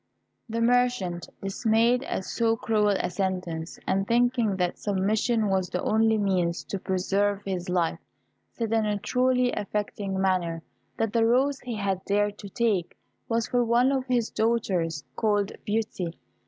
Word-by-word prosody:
The 230 +1 -2
merchant, 240 -8 +1
dismayed 225 +4 +2
at 190 - -3
so 225 -1 +1
cruel 210 -2 +2
a - - -1
sentence, 180 -3 -3
and 195 +1 0
thinking 240 -3 +2
that 180 -1 -1
submission 210 +3 +1
was 190 -2 0
the 180 - -2
only 220 0 +3
means 180 -4 0
to 195 - -2
preserve 195 +2 0
his 185 -2 -3
life, 175 -2 0 0.5
said, 225 -2 -3
in 220 -1 +2
a 210 -1 0
truly 250 +3 +2
affecting 205 -1 -3
manner, 175 -4 0 0.3
that 225 -2 -1
the 230 -1 +3
rose 270 +4 +2
he 245 -2 -5
had 195 -3 -1
dared 205 +1 0
to 200 - -8
take 205 -5 0 0.3
was 230 -1 +1
for 245 -1 +2
one 240 +3 +3
of 265 -1 -1
his 240 -3 +1
daughters, 185 -9 0
called 205 -2 +1 0.2
Beauty. 205 -5 -2
205 Hz, 155 wpm, -26 LUFS, 190-230 Hz, 0.5 s, only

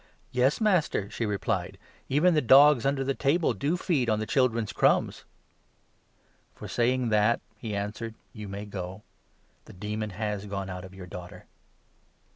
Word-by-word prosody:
" - - -37
Yes, 130 +3 +2
Master," 180 - +1
she 115 - -2
replied; 100 -3 -2 0.3
"even 155 +7 +4
the 155 - +3
dogs 135 0 +6
under 140 -1 0
the 135 +1 0
table 150 +5 +1
28 - - -14
do 150 +5 0
feed 145 -10 0
on 110 - +2
the 110 - -2
children's 115 +1 +1
crumbs." - - +1 1.3
"For - - -9
saying 125 0 +1
that," 105 +2 +3 0.2
he 105 0 -5
answered, 105 +3 -4 0.2
"you 105 -2 -8
may 100 +1 -6
go. 95 0 -7 0.6
The - - -13
29 90 - -17
demon 110 0 -2
has 105 -2 -3
gone 100 -1 -4
out 90 0 -7
of 95 +1 -13
your 95 -1 -9
daughter." 90 +1 -10
110 Hz, 170 wpm, -27 LUFS, 100-135 Hz, 1.3 s, dogs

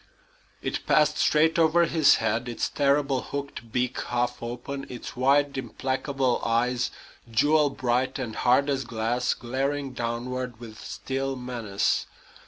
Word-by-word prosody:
It - - -2
passed 150 0 +3
straight 160 +2 +3
over 165 +1 +5
his 155 -3 +5
head, 115 +2 -1
its 120 - -2
terrible 140 -2 +2
hooked 140 -5 -6
beak 125 +1 -1
half 125 0 -1
open, 125 +4 -5
its 125 +1 -7
wide, 140 +2 +3
implacable 130 0 -1
eyes, 120 +2 +1 0.4
jewel 145 +6 +3
bright 130 0 0
and 120 -5 -4
hard 130 +3 +3
as 135 -2 0
glass, 115 +1 -1
glaring 135 +3 -2
downward 120 0 -3
with 110 -2 -10
still 135 0 -3
menace. 120 -6 -1
130 Hz, 130 wpm, -26 LUFS, 120-140 Hz, 0.4 s, over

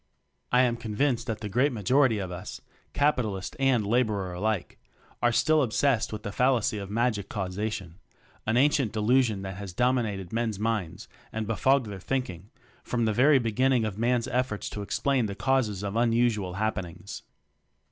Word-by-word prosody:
I 125 +1 +5
am 120 -2 +1
convinced 120 +3 -1
that 110 -2 -3
the 105 - -3
great 125 +8 +2
ma 115 -4 -5
jority 125 0 +3
of 90 - -6
us 90 +1 -7 0.3
capitalist 120 -10 0
and 130 -5 +2
laborer 105 -5 0
alike 100 +1 -2 0.4
are 120 - +3
still 155 +6 +3
obsessed 125 -1 +1
with 105 -1 -6
the 105 - -4
fal 130 +5 +3
lacy 110 -2 -1
of 100 - -7
magic 110 -2 0
causation; 95 -2 -4 0.5
an 110 +2 +2
ancient 135 -4 +3
delusion 110 -2 +2
that 95 -1 -6
has 100 -3 -7
dominated 110 -5 0
men's 115 -3 -1
minds 105 -4 -2 0.2
and 110 -2 -3
befogged 130 +4 +2
their 100 -3 -7
thinking 100 -5 -3 0.3
from 120 -2 -1
the 110 - +1
very 135 +5 +5
beginning 125 +1 +2
of 105 -1 -4
man's 120 0 +1
efforts 125 -4 -2
to 105 - -5
explain 130 +3 0
the 100 - -5
causes 115 -6 0
of 100 +1 -3
un 115 0 +2
usual 110 -6 +1
happenings. 95 -4 -4
110 Hz, 170 wpm, -27 LUFS, 100-125 Hz, 0.5 s, I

